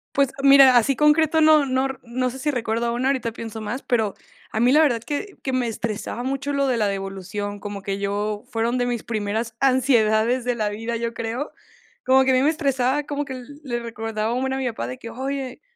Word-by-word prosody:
Pues 275 Hz, -1 st, +3 dB
mira, 275 Hz, -2 st, +8 dB
así 255 Hz, +4 st, +3 dB
concreto, 305 Hz, +2 st, +4 dB
no 310 Hz, -2 st, +6 dB
no 260 Hz, 0 st, +1 dB
r 255 Hz, -1 st, -3 dB
sé 265 Hz, -, -9 dB
si 295 Hz, -, -1 dB
recuerdo 235 Hz, -2 st, -1 dB
una, 250 Hz, +3 st, 0 dB
ahorita 255 Hz, -4 st, -1 dB
pienso 225 Hz, -1 st, -7 dB
más, 215 Hz, +5 st, -4 dB
pero 220 Hz, -5 st, 0 dB, 0.4 s
a 220 Hz, -, -2 dB
mí 245 Hz, +3 st, +4 dB
la 300 Hz, -, +6 dB
verdad 245 Hz, -7 st, +2 dB
que 365 Hz, -, -4 dB
que 265 Hz, -, -2 dB
me 255 Hz, -2 st, +1 dB
estresaba 225 Hz, +1 st, -4 dB
mucho 275 Hz, +2 st, -2 dB
lo 280 Hz, -1 st, +1 dB
de 250 Hz, -2 st, +1 dB
la 215 Hz, -2 st, +2 dB
devolución, 195 Hz, +1 st, -4 dB
como 200 Hz, -1 st, -7 dB
que 195 Hz, 0 st, -3 dB
yo 205 Hz, +1 st, -2 dB
fueron 230 Hz, +3 st, 0 dB
de 245 Hz, -, +1 dB
mis 240 Hz, -2 st, -2 dB
primeras 220 Hz, +1 st, -3 dB
ansiedades 245 Hz, -3 st, +3 dB
de 245 Hz, -1 st, 0 dB
la 215 Hz, -2 st, -1 dB
vida, 225 Hz, +3 st, -4 dB
yo 230 Hz, 0 st, -3 dB
creo, 235 Hz, +5 st, -4 dB, 0.5 s
como 265 Hz, +1 st, +5 dB
que 265 Hz, -, +3 dB
a -, -, +3 dB
mí 255 Hz, -, +4 dB
me 285 Hz, -, +4 dB
estresaba, 275 Hz, -3 st, 0 dB
como 290 Hz, 0 st, -3 dB
que 270 Hz, -2 st, -7 dB
el 275 Hz, +4 st, -10 dB
le 240 Hz, -4 st, -3 dB
recordaba 225 Hz, -1 st, -3 dB
un 250 Hz, -, -1 dB
buen 265 Hz, 0 st, -1 dB
a -, -, -2 dB
mi 265 Hz, -1 st, -1 dB
papá 220 Hz, -, -4 dB
de 125 Hz, +1 st, -6 dB
que 230 Hz, -, -9 dB
oye, 265 Hz, 0 st, -4 dB
245 Hz, 230 wpm, -23 LUFS, 220-270 Hz, 0.5 s, mira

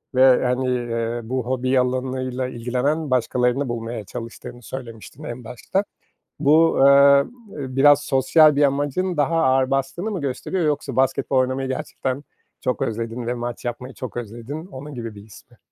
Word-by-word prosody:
ve, 130 Hz, -1 st, +5 dB
hani, 125 Hz, +1 st, 0 dB
eee, 120 Hz, -1 st, -2 dB
bu 125 Hz, +2 st, -3 dB
hobi 130 Hz, +1 st, +1 dB
alanıyla 130 Hz, 0 st, -1 dB
ilgilenen 130 Hz, +6 st, -1 dB
başkalarını 125 Hz, +2 st, +1 dB
bulmaya 115 Hz, -2 st, -4 dB
çalıştığını 120 Hz, +2 st, -8 dB
söylemiştin 120 Hz, +2 st, -9 dB
en 125 Hz, -4 st, -6 dB
başta. 125 Hz, -, -2 dB, 0.6 s
Bu, 160 Hz, +3 st, +4 dB
eee, 135 Hz, -, +5 dB, 0.7 s
eee, 130 Hz, -3 st, -5 dB
biraz 145 Hz, +1 st, +6 dB
sosyal 145 Hz, +3 st, +4 dB
bir 145 Hz, -, +2 dB
amacın 145 Hz, +6 st, 0 dB
daha 160 Hz, +3 st, +2 dB
ağır 130 Hz, -1 st, +2 dB
bastığını 135 Hz, +10 st, -1 dB
mı 185 Hz, -6 st, -3 dB
gösteriyor 155 Hz, +6 st, -2 dB
yoksa 145 Hz, -3 st, -1 dB
basketbol 135 Hz, +1 st, +1 dB
oynamayı 130 Hz, +1 st, +1 dB
gerçekten 130 Hz, 0 st, -3 dB, 0.4 s
çok 125 Hz, -, -1 dB
özledin 115 Hz, +1 st, -3 dB
ve 120 Hz, -, 0 dB
maç 120 Hz, 0 st, -5 dB
yapmayı 125 Hz, +2 st, -5 dB
çok 130 Hz, -1 st, -7 dB
özledin. 120 Hz, -, -6 dB
Onun 145 Hz, -3 st, -9 dB
gibi 115 Hz, -3 st, -6 dB
bir 100 Hz, -, -10 dB
his 110 Hz, -, -16 dB
mi? -, -, -21 dB
130 Hz, 155 wpm, -22 LUFS, 120-140 Hz, 0.7 s, biraz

